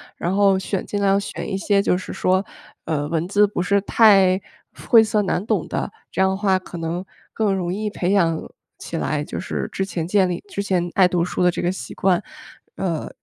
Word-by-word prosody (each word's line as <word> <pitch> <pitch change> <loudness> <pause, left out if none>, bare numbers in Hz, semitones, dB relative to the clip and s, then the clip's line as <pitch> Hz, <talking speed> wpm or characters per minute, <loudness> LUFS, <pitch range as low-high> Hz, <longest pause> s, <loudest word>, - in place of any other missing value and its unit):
然 175 +3 -2
后 195 -1 +4
选 190 0 -3
尽 205 - -3
量 195 0 +3
选 200 - -6
一 195 - -1
些 200 0 +2
就 180 - +1
是 185 - -7
说， 185 +2 +1 0.4
呃， 145 -3 -1
文 165 +2 -1
字 205 +2 +4
不 195 -3 -2
是 200 +2 +2
太 195 -4 +5 0.5
晦 230 -2 +7
涩 210 -1 +1
难 190 0 -1
懂 200 -8 0
的， - - -3 0.2
这 - - -1
样 190 - +4
的 190 - -1
话 195 -2 +2
可 180 -1 -10
能 165 +2 -3 0.3
更 205 -3 +1
容 180 -1 -2
易 210 +1 -2
培 190 -2 -2
养 165 -5 +2 0.4
起 - - -6
来， 150 -1 -1
就 - - -6
是 - - -3
之 190 - -2
前 175 -4 -4
建 190 -1 +3
立 175 - -4
之 200 - -4
前 180 -3 -1
爱 190 -2 +5
读 175 -1 0
书 180 - -3
的 180 - +5
这 - - -2
个 175 - +1
习 190 - -7
惯。 185 -2 +2 0.5
呃， 170 -5 -2
190 Hz, 235 characters per minute, -21 LUFS, 175-200 Hz, 0.5 s, 晦